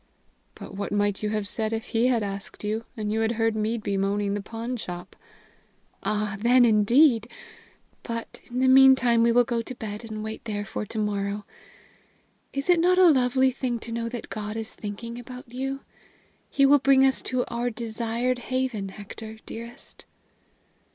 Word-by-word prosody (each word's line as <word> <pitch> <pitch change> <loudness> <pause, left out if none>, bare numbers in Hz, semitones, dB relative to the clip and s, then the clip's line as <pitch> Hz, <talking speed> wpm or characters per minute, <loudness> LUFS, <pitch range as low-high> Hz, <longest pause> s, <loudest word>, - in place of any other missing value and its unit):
"But - - -10
what 200 +1 -4
might 205 -1 0
you 210 - -1
have 210 -1 -2
said 220 +1 -2
if 225 0 -4
he 230 +2 +2
had 240 -4 +2
asked 200 0 -6
you, 215 +2 -2
and 210 -1 -2
you 220 - 0
had 225 +1 +1
heard 225 -1 +1
me 220 +2 0
bemoaning 200 -1 -1
the 205 - -2
pawnshop?" 225 -5 -6 0.9
"Ah, 210 -1 -1
then, 245 +3 +5
indeed! 230 +2 +4 0.7
But, 230 0 -6
in 245 - -5
the 260 - +4
meantime, 260 -3 +6
we 235 0 +4
will 245 +1 +5
go 235 0 -1
to 250 +2 -7
bed 215 -1 -6
and 215 0 -5
wait 220 0 -6
there 205 -2 -3
for 210 - -5
to 225 - -6
morrow. 205 -1 -2 1.1
Is 275 0 -3
it 355 -2 +5
not 360 +2 +4
a 365 -3 +7
lovely 260 -1 +3
thing 250 -2 -2
to 230 - -6
know 230 0 -2
that 240 0 -7
God 210 0 -4
is 225 -1 -5
thinking 230 +3 -6
about 250 0 -10
you? 270 +2 -3 0.7
He 275 - +3
will 285 +1 +6
bring 270 0 +5
us 265 - +3
to 255 -1 -1
our 240 +1 -1
desired 235 +2 -2
haven, 255 -5 -2
Hector, 215 +2 -9
dearest!" 235 +1 -10
230 Hz, 175 wpm, -26 LUFS, 210-250 Hz, 1.1 s, a